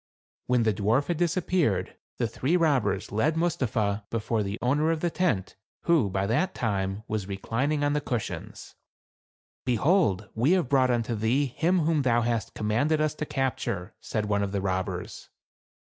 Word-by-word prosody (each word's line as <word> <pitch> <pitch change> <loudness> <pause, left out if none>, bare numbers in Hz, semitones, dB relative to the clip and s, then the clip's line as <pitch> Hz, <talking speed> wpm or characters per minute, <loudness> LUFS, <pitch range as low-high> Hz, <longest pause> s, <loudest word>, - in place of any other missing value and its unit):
When 125 -2 +3
the 110 -1 +2
dwarf 110 - +1
had 170 - 0
disappeared, 165 - 0 0.2
the 120 - 0
three 140 +9 0
robbers 135 - +1
led 145 +10 +1
Mustapha 110 -11 0
before 115 0 -1
the 100 +1 -3
owner 145 +6 +2
of 165 -1 +1
the 175 - 0
tent, 125 - 0 0.3
who, 160 -12 +3
by 95 +1 -1
that 155 - 0
time, 100 -2 -1
was 105 -3 -3
reclining 130 +9 -1
on 145 0 +2
the 150 - 0
cushions. 120 -6 -5 0.5
" - - - 0.3
Behold, 125 - +2
we 125 +10 +3
have 180 -9 +1
brought 130 -2 +4
unto 120 -1 0
thee 115 +6 +1
him 170 +7 +1
whom 155 -1 +2
thou 120 -3 +2
hast 115 -3 -2
commanded 130 +9 +1
us 155 -1 +1
to 155 0 -5
capture," 120 -7 -2
said 110 -2 -2
one 100 -1 +1
of 100 0 -2
the 100 - 0
robbers. 95 -1 -3
120 Hz, 170 wpm, -27 LUFS, 105-155 Hz, 0.5 s, brought